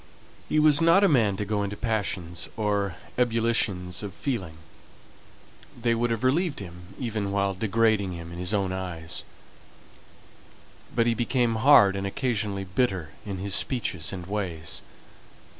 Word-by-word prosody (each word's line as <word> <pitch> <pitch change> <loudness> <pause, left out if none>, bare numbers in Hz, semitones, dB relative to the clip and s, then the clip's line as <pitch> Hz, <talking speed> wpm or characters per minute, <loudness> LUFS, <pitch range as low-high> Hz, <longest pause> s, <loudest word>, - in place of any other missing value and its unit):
He - - +1
was 150 -1 +6
not 165 +4 +6
a - - +7
man 110 - +3
to 105 - -2
go 105 0 -1
into 100 0 -3
passions, 95 -7 -2
or 100 -4 0 0.2
ebullitions 115 -7 +1
of 100 -4 -6
feeling: 95 - -3 1.2
they 115 0 +2
would 120 +1 0
have 115 0 -2
relieved 155 +5 +1
him, 90 0 -10
even 110 -5 -2
while 100 -1 +1
degrading 110 -1 +1
him 85 -1 -8
in 85 - -7
his 90 +1 -1
own 100 -3 0
eyes; 90 -4 -5 1.7
but 115 -1 +3
he 120 - +3
became 120 -1 +1
hard, 110 -6 +6
and 100 0 -2
occasionally 105 -3 -1
bitter 95 - -1 0.2
in 100 -2 -3
his 100 +1 -3
speeches 90 - 0
and 90 -2 -6
ways. 90 -5 -3
100 Hz, 145 wpm, -26 LUFS, 95-115 Hz, 1.7 s, a